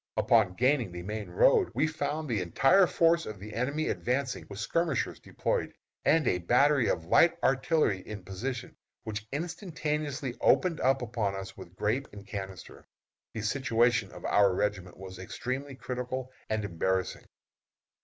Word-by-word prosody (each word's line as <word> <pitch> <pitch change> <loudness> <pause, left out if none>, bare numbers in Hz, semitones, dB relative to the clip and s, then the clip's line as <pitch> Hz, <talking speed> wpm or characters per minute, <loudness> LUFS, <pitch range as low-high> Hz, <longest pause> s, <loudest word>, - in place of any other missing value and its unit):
Upon 105 -6 +3
gaining 125 -3 +2
the 90 0 -7
main 105 +3 -5
road 485 -5 +4
we - - +3
found 155 0 -2
the 110 -6 0
entire 135 - +4
force 165 0 +3
of 105 -2 -7
the 105 +2 -9
enemy 140 +7 -1
advancing 125 +1 -2
with 100 - -8
skirmishers 155 +5 -1
deployed, - - -2 0.3
and 155 -3 +3
a 90 - +2
battery 125 - +3
of 80 - -1
light 165 - +5
artillery 135 - +2
in 100 +1 -8
position, 115 +6 -5 0.3
which 105 0 -5
instantaneously 150 - -3
opened 175 -4 +3
upon 120 -6 0
us 95 0 -7
with 85 - -12
grape 110 +8 -1
and 100 0 -10
canister. 95 -3 -8 0.5
The 110 - -3
situation 120 -2 +2
of - - -10
our 100 -2 +4
regiment 95 -3 -2
was 95 0 -9
extremely 130 +8 -4
critical 130 0 -4 0.2
and 110 -1 -1
embarrassing. 95 +1 -1
120 Hz, 145 wpm, -29 LUFS, 100-145 Hz, 0.5 s, light